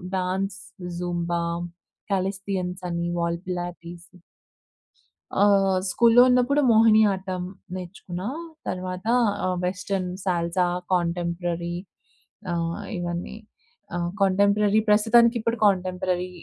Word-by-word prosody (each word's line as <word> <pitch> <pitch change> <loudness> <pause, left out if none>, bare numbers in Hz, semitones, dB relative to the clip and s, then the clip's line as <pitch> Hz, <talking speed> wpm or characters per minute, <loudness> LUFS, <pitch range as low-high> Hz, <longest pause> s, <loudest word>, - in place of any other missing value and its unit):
Dance, 190 +1 -2 0.4
Zumba, 175 -1 -2 0.7
callisthenics 190 -1 -2
అన్నీ 170 0 -2
wall 170 0 0
Pilates. 175 -1 -6 1.3
ఆహ్, 195 -2 +4
స్కూల్‌లో 235 +4 +6
ఉన్నప్పుడు 250 +4 +3
మోహిని 220 -1 +6
ఆటం 190 -1 -4 0.3
నేర్చుకున్న. 180 -1 -7 0.5
తర్వాత, 185 +1 -4 0.4
ఆహ్, 185 0 0
వెస్టర్న్, 185 0 -2
సాల్సా, 175 0 +1 0.3
కాంటెంపరరీ, 175 0 -1 0.8
ఆహ్, 170 +3 -2 0.2
ఇవన్నీ. 175 +3 -4 0.6
ఆ! - - -1 0.2
కాంటెంపరరీ 200 +2 +3
ప్రస్తుతానికి 230 +3 +5
ఇప్పుడు 230 +1 -1
కాంటెంపరరీ 185 -2 0
185 Hz, 90 wpm, -25 LUFS, 175-200 Hz, 1.3 s, స్కూల్‌లో